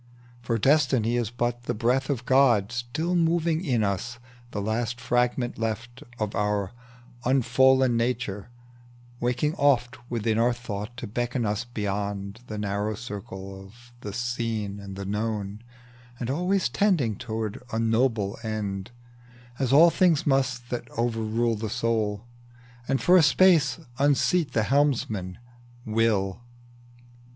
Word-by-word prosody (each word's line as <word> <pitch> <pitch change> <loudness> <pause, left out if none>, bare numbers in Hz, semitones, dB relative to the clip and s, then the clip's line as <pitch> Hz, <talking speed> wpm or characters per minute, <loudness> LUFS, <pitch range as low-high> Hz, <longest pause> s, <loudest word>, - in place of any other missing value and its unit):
For 115 -1 -1
Destiny 130 -3 +3
is 120 -3 0
but 120 0 -2
the - - -1
breath 125 +5 +1
of 125 -4 -2
God 120 -6 +4
Still 125 +9 -2
moving 165 0 +1
in 125 - +1
us, 105 +5 -2 0.3
the 105 - -4
last 115 +3 -2
fragment 120 +1 0
left 115 +4 -4 0.2
Of 105 -2 -2
our 105 -2 0 0.5
unfallen 130 0 +4
nature, 115 -4 -2 0.7
waking 125 +5 0
oft 125 -3 +2
Within 115 -1 0
our 120 +1 +3
thought, 115 -1 -6
to - - -5
beckon 120 +2 -2
us 105 +3 -1
beyond 100 -2 -3
The 105 - -5
narrow 105 +1 -2
circle 95 -3 -7
of 120 +5 -17
the 105 - -5
seen 115 -3 -3
and 100 -1 -8
known, 105 0 -3 0.6
And 120 +1 -2
always 180 +5 +1
tending 140 - +1
to 110 -2 -3 0.2
a 110 - -2
noble 115 -3 +1
end, 105 -3 -3 0.7
As 130 -2 0
all 165 +5 +7
things 170 -5 +3
must 130 -3 0
that 120 -1 -4
overrule 115 0 0
the 110 0 -4
soul, 110 -1 -1 0.6
And 135 0 +1
for 180 +1 +5
a - - +7
space 165 +2 +4 0.2
unseat 145 +3 +2
the 110 - +2
helmsman, 110 -9 0 0.5
Will. 110 -3 +1
120 Hz, 130 wpm, -26 LUFS, 105-130 Hz, 0.7 s, all